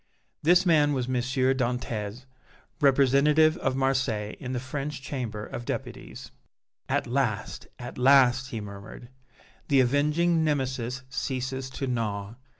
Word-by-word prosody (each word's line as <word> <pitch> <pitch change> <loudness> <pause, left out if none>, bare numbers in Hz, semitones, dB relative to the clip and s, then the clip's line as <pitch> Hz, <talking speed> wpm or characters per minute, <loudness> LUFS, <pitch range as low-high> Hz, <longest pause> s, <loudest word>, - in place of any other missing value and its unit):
This 175 +4 +4
man 150 -4 +4
was 130 -3 -1
M. 130 - -3
Dantès, 125 -3 -1 0.5
representative 145 +2 +4
of 130 -1 -1
Marseilles 130 -6 0
in 130 -2 -5
the 125 - -2
French 140 +2 -5
Chamber 120 -6 -5
of 120 - -7
Deputies. - - -6 0.6
"At 140 +2 +1
last, 125 -4 -2
at 120 +1 -8
last," 130 0 +5
he 115 -6 -4
murmured, 100 +4 -10 0.6
"the 140 -2 +4
avenging 150 +6 +2
Nemesis 130 -4 -2
ceases 130 0 -3
to 135 +1 -4
gnaw! 110 -5 -3
130 Hz, 125 wpm, -27 LUFS, 120-140 Hz, 0.6 s, last